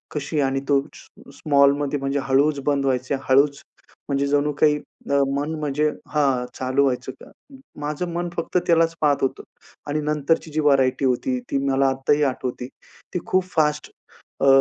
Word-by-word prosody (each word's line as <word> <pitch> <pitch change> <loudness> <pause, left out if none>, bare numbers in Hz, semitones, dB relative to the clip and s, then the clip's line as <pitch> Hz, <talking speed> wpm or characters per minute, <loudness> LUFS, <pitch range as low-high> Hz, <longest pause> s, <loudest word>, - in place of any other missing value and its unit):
कशी, 150 +1 -2
आणि 135 0 0
तो 140 -1 +4
स्मॉ - - -16
स्मॉलमध्ये 140 0 +2
म्हणजे 135 +1 -1
हळूच 140 +2 +2
बंद 140 -2 +1
व्हायच. 130 -1 0 0.2
हळूच 140 +2 +3 0.5
म्हणजे 140 0 +1
जणू 145 +1 +1
काही 150 -1 +5 0.3
अ, - - +2 0.2
मन 145 +3 -2
म्हणजे 150 +1 0 0.2
हां, 135 -4 +1
चालू 130 +2 +1
व्हायचं 130 -1 -1
का. - - -13 0.5
माझं 150 +4 -3
मन 175 0 -2
फक्त 165 +2 -1
त्यालाच 165 -1 +3
पाहत 145 -2 +3
होतं, 135 - -1 0.4
आणि 150 +1 -1
नंतरची 150 +2 0
जी 155 - -2
व्हरायटी 135 -2 +2
होती, 190 - 0
ती - - +1
मला 135 0 +2
आत्ताही 135 +3 +1
आठवते. 125 -1 -5 0.5
ती 180 - -1
खूप 185 0 +2
फास्ट 150 -2 +1 0.5
अ, 140 - +3
145 Hz, 160 wpm, -22 LUFS, 135-150 Hz, 0.5 s, काही